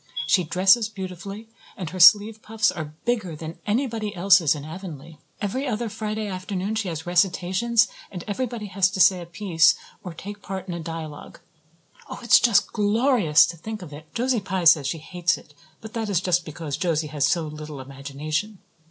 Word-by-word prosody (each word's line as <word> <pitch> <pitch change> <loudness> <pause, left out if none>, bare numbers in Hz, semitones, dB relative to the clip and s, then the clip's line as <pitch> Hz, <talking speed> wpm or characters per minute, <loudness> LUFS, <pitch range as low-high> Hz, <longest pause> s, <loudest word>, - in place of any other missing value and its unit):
She 180 +4 +3
dresses 190 +7 +3
beautifully, 195 +1 -7 0.3
and 175 -4 -5
her 185 - -6
sleeve 210 +4 +6
puffs 215 -1 +1
are 155 -2 -7
bigger 215 -9 -1
than 160 +2 -8
anybody 220 -2 -1
else's 180 -4 +4
in 145 -1 -7
Avonlea. 160 -2 -9 0.2
Every 255 +8 -2
other 230 -1 -2
Friday 215 +1 -4
afternoon 190 +1 -4
she 220 -3 -2
has 160 -2 -5
recitations 190 +6 +2 0.2
and 180 -3 -7
everybody 225 +1 -3
has 190 -1 +2
to 190 - -6
say 185 0 +5
a 170 - -9
piece 170 -4 +3 0.3
or 180 -4 -7
take 205 +4 -8
part 190 0 -6
in 180 - -4
a 170 - -5
dialogue. 160 -2 -7 0.7
Oh, - - -6
it's 235 - +7
just 235 -4 +3
glorious 210 - +4
to 170 - -6
think 215 +3 -7
of 150 -4 -10
it. 155 +1 -12
Josie 245 0 +1
Pye 190 -2 -3
says 160 -4 +6
she 150 - -2
hates 170 +1 -1
it 150 - -17 0.3
but 220 0 -10
that 225 -2 -3
is 190 -4 +2
just 180 -2 0
because 155 -2 -5
Josie 165 -4 0
has 145 -2 +1
so 170 0 +1
little 150 -1 -8
imagination. 145 +9 -4
185 Hz, 185 wpm, -24 LUFS, 160-210 Hz, 0.7 s, it's